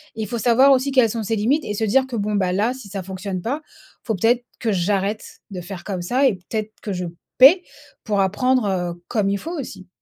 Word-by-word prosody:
il 220 -1 -3
faut 235 +3 -3
savoir 250 +5 +5
aussi 270 +1 +3
quelles 255 -4 +4
sont 225 0 -3
ses 225 +2 -1
limites 260 +9 +1
et 210 - -4
se 220 - -2
dire 260 +5 +2
que: 255 - -5
«Bon 210 -1 -1
bah 185 -2 +1
là 210 +7 +1
si 255 -6 -11
ça 195 -1 -5
fonctionne 190 0 -5
pas, 280 +7 -2
il - - -23 0.3
faut 225 - -1
peut-être 235 +6 +2 0.2
que 225 -3 0
j'arrête 195 +3 -1
de 180 -2 -5
faire 175 0 -8
comme 190 -3 -4
ça 250 +10 +1
et 245 - +2 0.2
peut-être 215 -1 -3
que 210 - -4
je 180 -1 -3 0.3
paie 305 +8 +8 0.4
pour 205 -3 -1
apprendre, 250 +6 +2
heu, 175 -2 -3
comme 210 -4 0
il 200 - 0
faut 335 - -6
aussi». 185 -8 -8
215 Hz, 240 wpm, -21 LUFS, 195-250 Hz, 0.4 s, paie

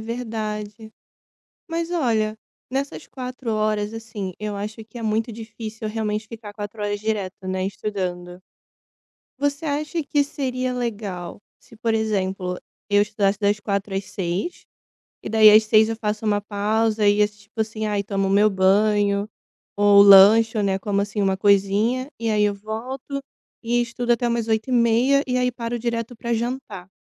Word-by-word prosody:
verdade. 220 -2 -5 0.8
Mas 335 +1 -2
olha, 220 -9 0 0.3
nessas 275 +1 -3
4 255 -2 -5
horas, 215 0 0
assim, 220 -5 -6
eu 210 -1 -4
acho 210 +3 -5
que 225 +2 -12
é - - -6
muito 220 +2 0
difícil 220 0 -7
realmente 215 0 -3
ficar 220 -3 -9
quatro 205 +1 -7
horas 205 0 -2
direto, 200 -3 -3
né, 185 0 -1
estudando. 180 -3 -4 1.0
Você 285 +2 -1
acha 300 +2 -2
que 285 0 +1
seria 255 -3 -3
legal 205 -7 -4 0.2
se, - - -18
por 225 0 0
exemplo, 190 -4 -1 0.3
eu 205 0 +4
estudasse 205 -1 0
das 205 0 +1
16h 200 -1 -2
às 195 0 -2
18h, 190 - -4 0.6
e - - -6
daí 220 -1 +7
às 215 +1 +7
18h 215 0 +4
eu 225 - -2
faço 215 0 -3
uma 205 -1 +2
pausa, 215 +1 0
e 205 +1 +4
esse 210 0 +1
tipo 220 +2 -9
assim, 220 0 -2
aí 205 -1 0
tomo 195 -1 -1
meu 205 +2 +4
banho 200 +1 +2 0.5
ou 205 0 +6
lanche, 210 +3 +7
né, 195 -1 +1
como 200 0 -1
assim 205 +1 -3
uma 190 -1 +1
coisinha, 205 +7 +2
e 230 -1 -1
aí 210 -1 +2
eu 205 -1 +1
volto 250 +7 -5 0.4
e 240 +1 +1
estudo 240 0 -1
até 240 +1 0
umas 235 -1 -1
20h30, 235 +4 +3
e 250 -1 -1
aí 250 0 +2
paro 235 0 -4
direto 235 0 -3
pra 235 +1 -3
jantar. 230 -6 -4
215 Hz, 160 wpm, -23 LUFS, 205-235 Hz, 1.0 s, daí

